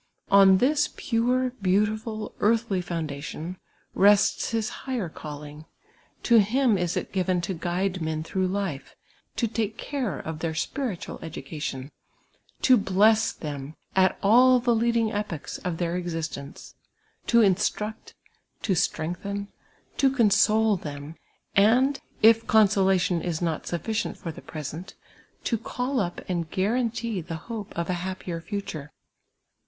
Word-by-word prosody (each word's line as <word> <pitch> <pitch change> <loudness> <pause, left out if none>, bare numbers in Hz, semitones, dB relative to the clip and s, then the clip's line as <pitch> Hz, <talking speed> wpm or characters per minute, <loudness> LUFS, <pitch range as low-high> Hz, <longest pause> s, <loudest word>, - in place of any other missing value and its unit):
On 195 -1 +7
this 290 +6 +3 0.2
])ure, 250 +2 +2
beautiful, 215 +3 0
<»artldy 215 -4 +1
foundation, 160 +1 -5 0.4
rests 205 +1 +4
his 225 -2 -1
higher 245 -10 -4
calling: 150 0 -9 0.6
to 235 -2 +6
him 235 +3 +3
is 175 -2 -1
it - - -4
given 185 -1 +1
to 170 +3 -3
guide 180 +2 -2
men 155 0 -2
through 185 +3 -1
life, 185 -7 -3 0.4
to 235 - +1
take 220 0 -2
care 255 - -3
of 160 -1 -6
their 160 -1 -2
spiritual 235 - -3
edu 160 -4 -8
cation, 140 -2 -5 0.7
to 255 -2 +7
bless 215 +3 +3
them 145 -1 -7 0.2
at 190 -1 +3
all 250 +5 +6
the 240 0 +2
leading 230 -1 +2
epochs 205 -7 -4
of 175 -2 -3
their 170 0 -1
exist 165 -3 -3
ence, 140 0 -10 0.5
to 235 0 +5
instruct, 210 +3 0 0.5
to 200 - +1
strengthen, 200 +5 -2 0.5
to 275 - +4
console 220 -3 +3
them, 145 -1 -7 0.4
and, 250 +7 +4 0.2
if 225 +1 +6
con 220 -1 +6
solation 190 -3 +2
is 170 -3 -2
not 165 -3 -2
sufTicient 215 +6 -2
for 165 - -5
the - - -11
present, 155 +4 -7 0.5
to 230 - 0
call 250 +4 -2
up 175 -4 -2
and 170 -3 -2
guaran 230 +7 +1
tee 225 -4 -3
the 165 -1 -6
hoj)C 220 -4 -5
of 170 0 -3
a 175 -1 -2
happier 180 -2 -5
future. 185 -7 -5
195 Hz, 140 wpm, -26 LUFS, 165-225 Hz, 0.7 s, On